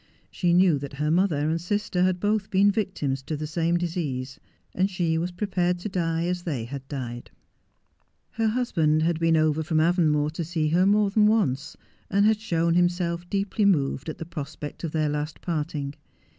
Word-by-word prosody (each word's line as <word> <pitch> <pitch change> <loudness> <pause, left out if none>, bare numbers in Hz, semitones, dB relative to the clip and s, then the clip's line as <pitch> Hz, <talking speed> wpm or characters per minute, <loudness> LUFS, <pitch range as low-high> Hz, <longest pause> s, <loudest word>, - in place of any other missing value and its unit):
She 175 -2 0
knew 175 -4 +4
that 140 0 -7
her 150 +2 -1
mother 165 -4 +2
and 165 +1 0
sister 190 0 -1
had 185 0 +2
both 210 +1 0
been 200 0 +4
victims 185 -10 -2
to 150 +3 -4
the 155 - -4
same 165 +2 0
disease, 150 -6 -3 0.3
and 190 +2 +1
she 175 -4 0
was 175 +2 -1
prepared 180 -2 0
to 180 +5 -5
die 165 -3 -1
as 180 0 -1
they 145 -10 -3
had 135 +2 -7
died. 120 -4 -6 1.0
Her 225 0 0
husband 165 -10 +1
had 165 0 +1
been 165 -1 +3
over 155 0 +2
from 160 0 -1
Avonmore 155 -3 +2
to 165 +2 -4
see 160 -1 -1
her 180 +4 +3
more 205 0 +3
than 210 +1 +4
once, 165 - 0 0.3
and 200 +1 +3
had 215 0 +3
shown 170 -5 +1
himself 175 0 0
deeply 200 +1 -1
moved 150 -6 +1
at 155 - -6
the 165 - -6
prospect 150 -2 -7
of 165 - -2
their 155 -1 0
last 150 +1 -3
parting. 150 -4 -3
170 Hz, 185 wpm, -25 LUFS, 150-185 Hz, 1.0 s, knew